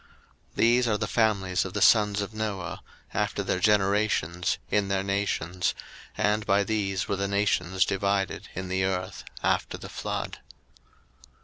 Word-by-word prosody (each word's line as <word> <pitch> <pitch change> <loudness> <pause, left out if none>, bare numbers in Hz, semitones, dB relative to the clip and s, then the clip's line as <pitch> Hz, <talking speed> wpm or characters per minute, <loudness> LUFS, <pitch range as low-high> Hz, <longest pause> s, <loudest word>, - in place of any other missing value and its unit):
01:010:032 - - -31
These 120 +1 +4
are 105 -2 +2
the 105 - -1
families 100 -5 +1
of 95 - -6
the 100 - -1
sons 105 -2 +5
of 100 +2 -5
Noah, 100 -5 -4 0.3
after - - -1
their 90 - -1
generations, 100 -4 +2
in 105 -1 +2
their 95 0 0
nations: 95 -3 -1 0.4
and 105 +1 +1
by 100 0 +3
these 95 -3 -1
were 100 - -1
the 100 +1 -1
nations 95 -2 +1
divided 100 0 -1
in 95 +1 -4
the 95 +1 0
earth 95 0 -2 0.2
after - - 0
the - - -9
flood. - - -4
100 Hz, 150 wpm, -27 LUFS, 95-105 Hz, 0.4 s, sons